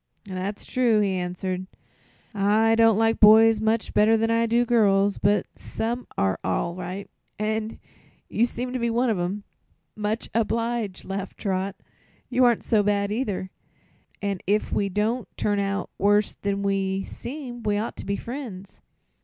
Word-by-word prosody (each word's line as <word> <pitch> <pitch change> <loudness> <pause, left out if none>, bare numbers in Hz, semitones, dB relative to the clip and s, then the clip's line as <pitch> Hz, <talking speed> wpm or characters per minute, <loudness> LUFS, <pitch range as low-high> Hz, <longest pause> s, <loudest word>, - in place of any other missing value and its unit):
"That's 195 +1 -4
true," 240 -4 +2
he 200 -2 +1
answered. 185 +1 -3 0.7
"I 210 +2 +3
don't 225 -2 +5
like 225 0 +2
boys 220 +1 +7
much 220 0 0
better 220 +2 +4
than 225 +1 +1
I 230 0 +2
do 235 +2 +2
girls; 205 -4 +3
but 205 +1 +2
some 240 +2 -4
are 95 -1 +1
all 95 - -1
right, 185 +2 -6 0.3
and 220 +1 -2 0.5
you 235 +2 +1
seem 250 +1 -4
to 255 - -1
be 235 0 0
one 235 +1 +1
of 205 - -1
'em." 190 +4 -2 0.5
"Much 215 +2 -2
obliged," 230 -2 -1
laughed 195 0 -5
Trot. 190 -1 -2 0.5
"You 255 0 +2
aren't 240 -2 +3
so 215 -2 +3
bad, 205 0 0
either, 205 -5 -2 0.7
an' 200 -2 -1
if 210 +2 +1
we 200 - +1
don't 215 +5 -1
both - - -44
turn 205 -1 0
out 200 0 -2
worse 205 +1 +3
than 200 0 -3
we 195 -1 0
seem 250 -1 -7
we 210 -2 0
ought 215 +2 -3
to - - -7
be 200 - 0
friends." 230 -6 -8
210 Hz, 160 wpm, -25 LUFS, 195-230 Hz, 0.7 s, boys